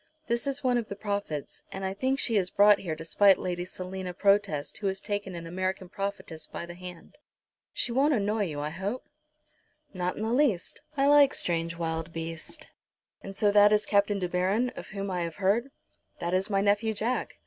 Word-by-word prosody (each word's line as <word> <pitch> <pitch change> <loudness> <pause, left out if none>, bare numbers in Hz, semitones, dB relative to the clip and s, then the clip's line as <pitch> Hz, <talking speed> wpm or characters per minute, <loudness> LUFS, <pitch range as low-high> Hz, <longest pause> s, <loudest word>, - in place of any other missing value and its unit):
This 235 0 -1
is 275 +1 -2
one 250 -2 +3
of 225 - -5
the 200 - -4
prophets, 200 -8 -4
and 195 0 -4
I 190 - -1
think 260 +7 0
she 235 -4 0
is 185 -3 +2
brought 205 +1 +6
here 165 -5 -3
to 160 +1 -9
spite 195 +3 +5
Lady 175 -1 -3
Selina 185 0 -6
Protest 195 -8 +2
who 205 - -1
has 190 0 -1
taken 205 -2 -4
an 170 -1 -6
American 185 +1 -3
prophetess 195 -5 -4
by - - -6
the 175 - -8
hand. 180 +9 -10 0.5
She - - -1
won't 275 +5 +3
annoy 210 0 +1
you, 150 -5 -4
I 150 +1 -3
hope?" 195 +9 -4 0.9
"Not 180 -1 -2
in 215 - -3
the 225 +1 0
least. 245 - +1 0.2
I 275 - +3
like 285 -1 +6
strange 165 -1 -1
wild 165 -1 -3
beasts. 165 -1 -6 0.6
And 195 - -8
so 205 +1 +3
that 205 0 +7
is 210 0 +3
Captain 205 0 +2
De 185 -2 -1
Baron, 190 +8 +1
of - - -9
whom 195 -1 -4
I 180 -1 -1
have 170 -1 -3
heard?" 205 +7 +1 0.5
"That 170 +1 -3
is 190 +3 +1
my 195 -1 +2
nephew, 210 +2 +2
Jack. 235 +5 -2
195 Hz, 205 wpm, -28 LUFS, 175-215 Hz, 0.9 s, that